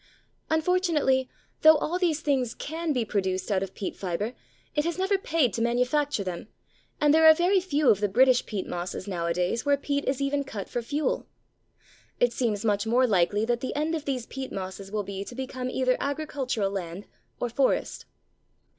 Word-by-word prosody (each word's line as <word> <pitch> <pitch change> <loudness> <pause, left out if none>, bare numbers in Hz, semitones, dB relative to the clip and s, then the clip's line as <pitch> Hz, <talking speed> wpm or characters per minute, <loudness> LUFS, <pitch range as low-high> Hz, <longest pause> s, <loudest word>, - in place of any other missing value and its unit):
Unfortunately, 315 -6 +2 0.3
though 315 0 +8
all 350 +4 -2
these 325 -4 +1
things 260 -6 0
can 325 +1 -3
be 250 -5 0
produced 190 -1 -1
out 190 -2 +2
of 195 -1 -5
peat 195 - -4
fibre, 195 +5 -3 0.4
it 295 - +1
has 340 +1 -2
never 385 +2 +1
paid 320 - +1
to 230 - -2
manufacture 250 +2 +1
them, 180 +1 -5 0.5
and 295 0 +4
there 320 0 +6
are 315 - +9
very 360 +4 +3
few 305 -6 0
of 205 - +5
the 205 - +1
British 250 +5 +4
peat 200 -4 -3
mosses 175 +2 -5
nowadays 180 +4 -1
where 285 -1 +3
peat 285 0 -2
is 265 0 0
even 280 0 0
cut 215 -8 -6
for 240 - -3
fuel. 290 +6 -2 0.9
It 245 -1 +3
seems 230 -4 -1
much 205 0 +1
more 250 +3 +4
likely 205 0 +2
that 240 0 0
the 260 - -3
end 305 +3 0
of 315 -3 -3
these 255 -4 -2
peat 265 +1 -6
mosses 190 +1 -6
will 210 -1 -1
be 195 0 -5
to 240 - -10
become 255 -1 -4
either 255 0 +1
agricultural 275 -8 -2
land 185 0 -5 0.3
or 245 - -1
forest. 260 +3 0
255 Hz, 185 wpm, -27 LUFS, 205-295 Hz, 0.9 s, are